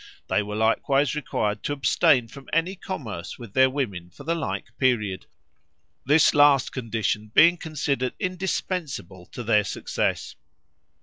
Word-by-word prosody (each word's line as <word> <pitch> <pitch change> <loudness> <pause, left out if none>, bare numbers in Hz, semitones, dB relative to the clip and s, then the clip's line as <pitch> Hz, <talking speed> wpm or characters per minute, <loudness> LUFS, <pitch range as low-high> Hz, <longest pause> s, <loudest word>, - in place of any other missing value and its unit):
They - - +2
were 105 0 -5
likewise 125 +5 +2
required 110 -8 -2
to 145 - -2
abstain 130 -3 +3
from 135 +4 -13
any 165 +3 +1
commerce 125 - -6
with 115 -5 -11
their 130 0 +5
women 100 -11 -4
for 140 - -13
the 165 +4 0
like 165 - -4
period, 105 -8 0 0.8
this 150 +3 +5
last 145 -3 +5
condition 110 -3 -2
being 170 +2 +7
considered 140 -6 -2
indispensable 180 - -3
to 120 - -8
their 105 -2 +3
success. - - -3
130 Hz, 135 wpm, -25 LUFS, 110-150 Hz, 0.8 s, being